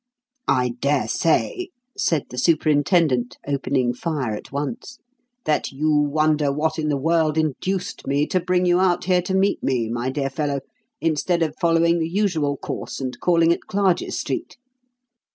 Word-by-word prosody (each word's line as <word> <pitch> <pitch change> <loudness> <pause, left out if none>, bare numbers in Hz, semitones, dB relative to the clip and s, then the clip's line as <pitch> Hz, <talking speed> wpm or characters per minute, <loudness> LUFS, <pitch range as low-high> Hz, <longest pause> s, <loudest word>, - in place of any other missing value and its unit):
"I 125 -2 +2
dare 140 -4 +1
say," 185 - 0 0.3
said 160 -5 0
the 125 - -4
superintendent, 150 -3 +2
opening 135 -3 0
fire 135 -4 -2
at 105 - -8
once, 230 - -4 0.5
"that 150 - 0
you 150 +3 0
wonder 150 0 +2
what 155 +3 -1
in 155 -1 -1
the 145 - +1
world 160 +1 +1
induced 175 +5 -2
me 140 +2 +2
to 185 - 0
bring 180 +1 +1
you 175 0 +3
out 180 -1 +2
here 180 -1 +3
to 190 +2 -2
meet 195 +1 +2
me, 120 -4 0
my 120 +2 -2
dear 135 0 -2
fellow, 145 -1 -2 0.4
instead 165 +2 +1
of 155 -2 -1
following 170 0 +3
the 160 0 -1
usual 165 -7 0
course - - -5
and 130 -2 -4
calling 170 -1 +4
at - - -8
Clarges 195 -3 +1
Street? - - -4
155 Hz, 160 wpm, -22 LUFS, 140-175 Hz, 0.5 s, calling